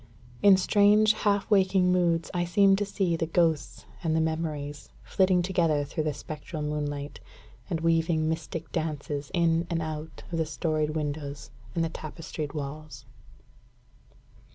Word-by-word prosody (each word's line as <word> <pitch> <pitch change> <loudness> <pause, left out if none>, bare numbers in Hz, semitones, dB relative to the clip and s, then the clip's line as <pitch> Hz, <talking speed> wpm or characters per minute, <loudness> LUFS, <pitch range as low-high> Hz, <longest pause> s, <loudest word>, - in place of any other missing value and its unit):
In 200 -2 +7
strange, 210 +3 +5
half 205 -2 0
waking 190 -2 +4
moods, 170 -2 +1
I 175 -1 0
seem 195 +3 +4
to 205 0 -1
see 190 -4 0
the 165 0 -2
ghosts 160 -4 0 0.2
and 160 -2 0
the - - +2
memories 155 -3 -3
flitting 185 -2 +2
together 170 -5 +1
through 155 +2 -3
the 150 - 0
spectral 150 +1 -6
moonlight, 145 -1 -3 0.5
and 165 -3 -2
weaving 165 -1 +2
mystic 160 0 -4
dances 150 -3 -3
in 170 -1 +2
and 170 -1 0
out 155 0 -6
of 165 - -1
the 160 - +1
storied 155 -1 -1
windows 145 -3 -4 0.2
and 165 - +1
the 165 - -1
tapestried 155 -2 -6
walls. 145 -2 -7
160 Hz, 145 wpm, -27 LUFS, 150-175 Hz, 0.5 s, In